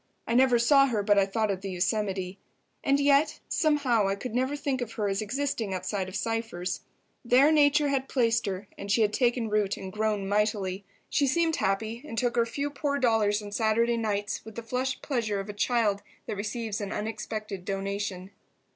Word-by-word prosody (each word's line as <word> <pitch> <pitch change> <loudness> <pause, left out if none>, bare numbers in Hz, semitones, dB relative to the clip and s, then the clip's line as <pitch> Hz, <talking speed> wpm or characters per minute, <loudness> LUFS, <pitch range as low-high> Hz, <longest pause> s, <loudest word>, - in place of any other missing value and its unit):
I 230 - -2
never 255 0 +5
saw 275 +4 +5
her 220 -5 0
but 205 0 +4
I 195 - +3
thought 215 +1 0
of 190 -1 -3
the 195 - -5
Yosemite. 190 0 -1 0.4
And 275 0 +3
yet, 285 +1 +3
somehow, 285 -10 +2
I 195 - 0
could 220 +3 -6
never 260 +4 0
think 275 -3 -2
of 230 -2 -4
her 210 -2 -1
as 195 +1 -1
existing 225 -3 -2
outside 190 0 -3
of 190 - -9
Cypher's. 225 -5 -2 0.4
There 260 +5 +5
nature 295 -1 +4
had 270 -1 -1
placed 230 -3 +2
her, 195 +1 -4
and 200 - -4
she 225 +2 +4
had 210 0 +1
taken 240 -1 +1
root 210 -2 +1
and 190 -1 -7
grown 215 -2 -1
mightily. 200 -2 0 0.3
She 285 - +2
seemed 325 +3 +2
happy, 220 +5 -1
and 265 -7 -8
took 240 +1 +1
her 235 -1 +2
few 280 +5 -3
poor 280 0 -1
dollars 220 -5 +2
on 205 - -8
Saturday 230 +2 +2
nights 210 -2 -2
with 220 0 -11
the 235 - -6
flushed 255 +3 -2
pleasure 230 -7 -1
of 195 +1 -6
a - - -4
child 210 -1 +1 0.2
that - - -4
receives 215 +1 -3
an 200 - -4
unexpected 215 -2 -4
donation. 195 -1 -3
220 Hz, 195 wpm, -28 LUFS, 200-255 Hz, 0.4 s, never